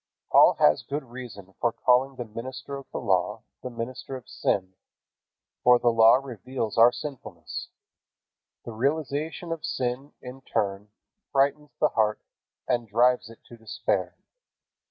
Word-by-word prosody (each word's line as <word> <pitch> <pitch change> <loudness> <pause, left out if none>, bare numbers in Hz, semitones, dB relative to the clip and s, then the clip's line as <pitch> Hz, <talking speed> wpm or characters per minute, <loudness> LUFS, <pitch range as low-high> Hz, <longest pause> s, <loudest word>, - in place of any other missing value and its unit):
Paul - - +7
has 75 0 +4
good 145 +1 -4
reason 120 -6 -10
for 120 - +3
calling 130 +3 +2
the 120 - -5
minister 120 +5 -7
of 140 -1 -9
the - - -4
Law - - 0 0.2
the 125 - -5
minister 125 +3 -6
of 130 -3 -10
sin, 95 -1 -1 0.9
for 125 0 +7
the 120 0 +2
Law 115 0 +7
reveals 130 -3 -4
our 115 +2 +7
sinfulness. 130 +2 -7 1.0
The - - -6
realization 150 +7 -2
of 165 -2 -4
sin 130 +3 -3
in 125 +1 -10
turn 100 -4 -2 0.4
frightens 140 +2 +1
the 150 - +4
heart 110 -1 +1 0.5
and 120 -2 0
drives 120 +2 +3
it 115 - -15
to 120 - -14
despair. 110 -1 -2
125 Hz, 140 wpm, -26 LUFS, 115-135 Hz, 1.0 s, Paul